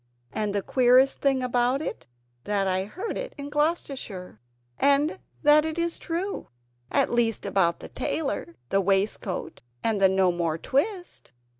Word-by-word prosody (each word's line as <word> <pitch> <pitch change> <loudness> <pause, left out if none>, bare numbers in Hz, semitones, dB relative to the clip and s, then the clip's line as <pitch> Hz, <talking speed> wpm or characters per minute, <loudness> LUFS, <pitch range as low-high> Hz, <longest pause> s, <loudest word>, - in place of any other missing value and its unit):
And 210 -1 -1
the 200 - 0
queerest 255 +1 +4
thing 270 -2 +2
about 250 +1 +1
it 295 - -5
is 120 0 -43
that 200 -2 +1
I 190 0 0
heard 375 - -5
it - - -6
in 285 0 -7
Gloucestershire, 275 - -2 0.4
and 285 +5 +3 0.2
that 300 0 +6
it 315 0 -3
is 340 0 -1
true 360 +4 -3 0.4
at - - +2
least 235 -2 +1
about 170 -4 +1
the - - -7
tailor, 265 - -3
the 195 - +2
waistcoat, 195 0 -1 0.2
and 220 -3 +1
the 190 - +7
"No 190 -1 +3
more 170 -2 -1
twist!" 350 - -2
245 Hz, 155 wpm, -26 LUFS, 190-295 Hz, 0.4 s, the